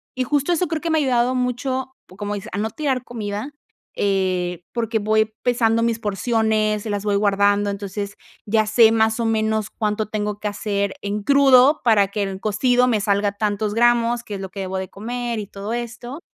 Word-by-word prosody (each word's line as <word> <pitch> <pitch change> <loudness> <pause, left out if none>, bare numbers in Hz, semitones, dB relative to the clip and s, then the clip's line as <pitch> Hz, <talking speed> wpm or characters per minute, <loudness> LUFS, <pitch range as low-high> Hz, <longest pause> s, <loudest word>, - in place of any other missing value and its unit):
y, 255 - 0
justo, 290 +4 0
eso 350 +1 +1
creo 315 0 -3
que 335 - -2
me 320 - +2
ha - - +1
ayudado 250 -2 +2
mucho, 255 +1 -2 0.2
como 205 0 -3
dices, 210 +3 -7
a - - -2
no 220 +1 -1
tirar 265 -4 -1
comida, 215 +3 -5 0.4
eh, 185 -3 0
porque 225 -2 -1
voy 215 +1 +1
pesando 230 -2 +2
mis 230 -1 +1
porciones, 215 0 0
las 205 -1 -3
voy 205 - +1
guardando. 205 0 +2
Entonces, 200 0 -5 0.3
ya 215 +1 +2
sé, 220 +1 +5
más 220 0 +2
o - - 0
menos, 220 -1 0
cuánto 215 -1 -2
tengo 210 -1 -3
que 210 0 -2
hacer 200 -1 -2
en 205 0 -3
crudo 275 +1 +5
para 205 -4 +4
que 205 0 -2
en 195 -1 -4
cocido 245 +5 +2
me 225 -4 +2
salga 200 0 +1
tantos 210 0 -1
gramos, 240 0 +3
que 210 - -8
es 195 - -6
lo 190 - -6
que 195 - -9
debo 190 0 -3
de 190 0 -4
comer 235 +2 -4
y 205 - -6
todo 200 +2 -7
esto. 240 +4 -6
215 Hz, 200 wpm, -21 LUFS, 205-240 Hz, 0.4 s, sé